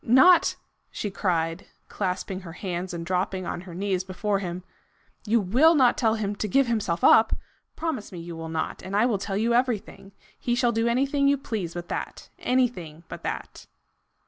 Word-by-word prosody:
"Not 265 +10 +6 0.2
" - - -47
she 205 - -4
cried, 165 -2 -1 0.2
clasping 185 -1 -3
her 170 -4 -10
hands 180 0 -4
and 170 -1 -5
dropping 185 +1 -1
on 175 - -4
her 180 -2 -10
knees 190 -1 -1
before 195 +2 -1
him, 180 -1 -5 0.3
" - - -26
you 230 +2 +4
WILL 255 - +4
not 255 -4 +5
tell 225 -3 +2
him 205 -2 -2
to 215 - -2
give 275 +7 +3
himself 215 -8 -1
up? 220 0 +6 0.4
Promise 320 -12 -3
me 180 - -8
you 170 0 -7
will 165 0 -6
not, 160 -1 -3
and 190 +1 -5
I 215 +3 +4
will 225 -5 +1
tell 195 0 -3
you 230 +3 +1
everything. 235 -5 -1 0.3
He 240 - 0
shall 245 -1 +2
do 225 0 +1
anything 275 +4 +2
you 280 0 +4
please 205 -10 -4
but 175 0 -5
that! - - -5
Anything 205 -12 -1
but - - -7
that!" - - -6
200 Hz, 195 wpm, -26 LUFS, 180-240 Hz, 0.4 s, Not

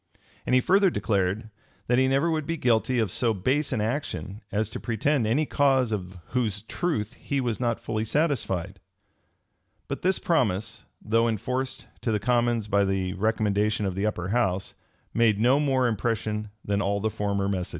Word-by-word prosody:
And 125 - +3
he 130 - +5
further 195 +5 +4
declared, 105 - -1 0.3
"That 125 +1 +3
he 130 - +4
never 135 +5 +2
would 155 -2 -1
be 165 - -1
guilty 120 -1 +2
of 110 -5 +1
so 115 0 +1
base 135 +10 0
an 105 - 0
action 110 -3 -3
as 105 +1 0
to - - -5
pretend 120 +2 0
any 140 +8 +2
cause 135 -5 +2
of 95 -3 -4
whose 110 -5 -1
truth 115 - -2
he 140 +2 -3
was 120 -5 -1
not 120 -2 0
fully 110 -1 -2
satisfied."[] 110 - -1 1.1
But - - -4
this 185 0 +2
promise, 115 - 0 0.2
though 115 +2 +2
enforced 125 +4 -2 0.2
to 115 - 0
the 105 - +1
commons 120 -1 +1
by 100 -1 +3
the 95 -1 -1
recommendation 105 0 +1
of 95 - -1
the 100 +3 0
upper 90 -3 -3
house, 95 -5 0 0.4
made 110 -3 +3
no 125 +5 +4
more 135 -4 +2
impression 110 -1 -1 0.2
than 100 0 0
all 100 0 0
the 110 +2 -1
former 100 -1 -1
messages. 95 -3 -2
110 Hz, 175 wpm, -26 LUFS, 100-130 Hz, 1.1 s, he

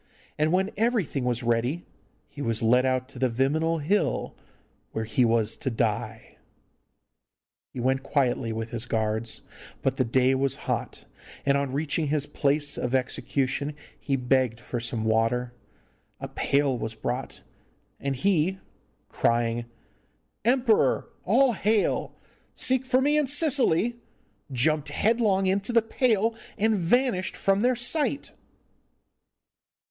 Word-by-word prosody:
And 155 +1 +1
when 190 +3 +1
everything 210 - 0
was 120 -1 0
ready 120 +8 0 0.4
he 145 - -10
was 115 -3 -1
led 125 +3 +4
out 130 0 0
to 125 - -11
the 130 0 +2
Viminal 150 +6 0
Hill, 200 +7 0 0.6
where 110 - -2
he 115 +3 +1
was 115 -2 +2
to - - -2
die. 110 -1 -3 1.3
He - - -7
went 130 +2 +1
quietly 130 -4 0
with 110 0 -4
his 120 0 -3
guards, 110 0 -2 0.4
but - - 0
the - - +3
day 130 +2 +2
was 135 0 0
hot, - - -3 0.4
and 140 0 +3
on 140 -1 -1
reaching 150 +2 -1
his 145 0 0
place 145 0 0
of 125 +1 -1
execution 135 +2 -1 0.2
he 140 - -1
begged 125 -2 +1
for 120 0 -4
some 115 -1 -2
water. 115 +2 +1 0.7
A - - -5
pail 140 -1 +1
was 110 -1 -4
brought, 125 +4 -4 0.6
and 140 -1 -2
he, 185 +4 +1 0.5
crying 115 0 0 0.8
'Emperor, 240 -1 +2 0.2
all 270 -3 +4
hail! 210 +1 0 0.4
seek 260 0 +2
for 255 0 +3
me 295 +2 +3
in 295 - 0
Sicily,' 255 - +2 0.5
jumped 150 +4 +1
headlong 215 -4 +2
into 195 +4 0
the 230 -2 +4
pail, 225 -2 +1 0.2
and 220 +1 +2
vanished 190 +1 +1
from 195 +1 +2
their 250 +2 +3
sight. 280 +3 0
140 Hz, 130 wpm, -26 LUFS, 120-200 Hz, 1.3 s, led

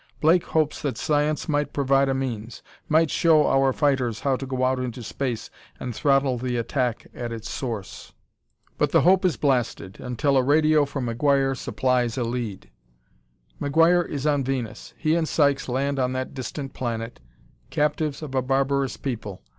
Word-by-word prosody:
Blake 165 +3 +4
hopes 155 -2 0
that 140 -6 -2
science 150 0 0
might 145 -2 0
provide 135 -1 +2
a 135 - +1
means; 120 -4 -4 0.3
might 160 0 +3
show 160 -3 +4
our 135 0 +3
fighters 130 -5 0
how 135 -2 +1
to 135 +1 -6
go 130 -1 -2
out 130 0 +1
into 125 -1 -4
space 120 0 -4 0.3
and 125 - -4
throttle 135 0 +2
the 125 0 -2
attack 120 0 -1
at 120 -1 -5
its 115 -1 -6
source. 115 -7 -5 0.7
But - - +2
the - - +5
hope 185 +2 +4
is 175 -8 +2
blasted, 125 -8 -1
until 130 +3 0
a 130 - +4
radio 155 +2 +4
from 140 -2 -4
McGuire 135 +3 +2
supplies 125 -2 0
a 125 - 0
lead. 115 -4 -4 0.9
McGuire 165 +4 +3
is 145 -1 -4
on 145 -2 +2
Venus. 125 -5 -4
He 155 - +1
and 165 -1 +1
Sykes 140 -4 +1
land 135 +2 -1
on 130 0 0
that 130 0 -4
distant 135 +1 -6
planet, 115 - -4 0.5
captives 150 0 -1
of 145 -3 -7
a 130 - +2
barbarous 135 +1 0
people. 110 -8 -5
135 Hz, 170 wpm, -24 LUFS, 125-145 Hz, 0.9 s, the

